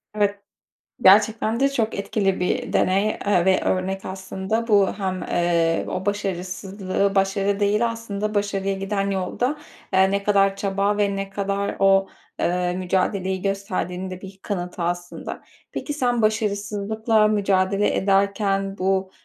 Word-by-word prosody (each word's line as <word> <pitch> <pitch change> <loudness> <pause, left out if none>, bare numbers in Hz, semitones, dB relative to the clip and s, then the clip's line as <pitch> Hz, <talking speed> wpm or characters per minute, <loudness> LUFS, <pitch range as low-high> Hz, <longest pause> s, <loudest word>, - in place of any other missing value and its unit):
Evet, 205 -1 +1 0.6
gerçekten 215 +4 +4
de 275 - +4
çok 230 -5 -1
etkili 200 -1 -1
bir 180 - -1
deney, 200 +3 +2
ııı, 190 -4 +3
ve 190 0 +3
örnek 190 +1 -1
aslında. 190 +4 -3
Bu 200 -3 +4
hem, 185 -2 -2
ııı, 170 -1 +1
o 185 +2 -4
başarısızlığı 195 0 -2
başarı 195 +1 +1
değil 210 +3 +2
aslında, 215 -2 -4
başarıya 195 -1 0
giden 195 0 -2
yolda, 190 +5 -1 0.5
ııı, 190 0 +5
ne 200 0 0
kadar 195 -1 +3
çaba 200 +1 0
ve 200 -1 +1
ne 195 0 -4
kadar 200 0 -2
o, 195 0 +4 0.3
ııı, 180 0 0
mücadeleyi 185 +1 -1
gösterdiğinin 190 -2 -3
de 185 - -7
bir 190 0 -11
kanıtı 180 -3 -4
aslında. 175 +1 -4 0.3
Peki 295 - -4
sen 245 -5 0
başarısızlıkla 215 +1 +1
mücadele 200 -1 +1
ederken 195 0 +1
bu, 190 0 0
195 Hz, 135 wpm, -23 LUFS, 190-205 Hz, 0.6 s, ııı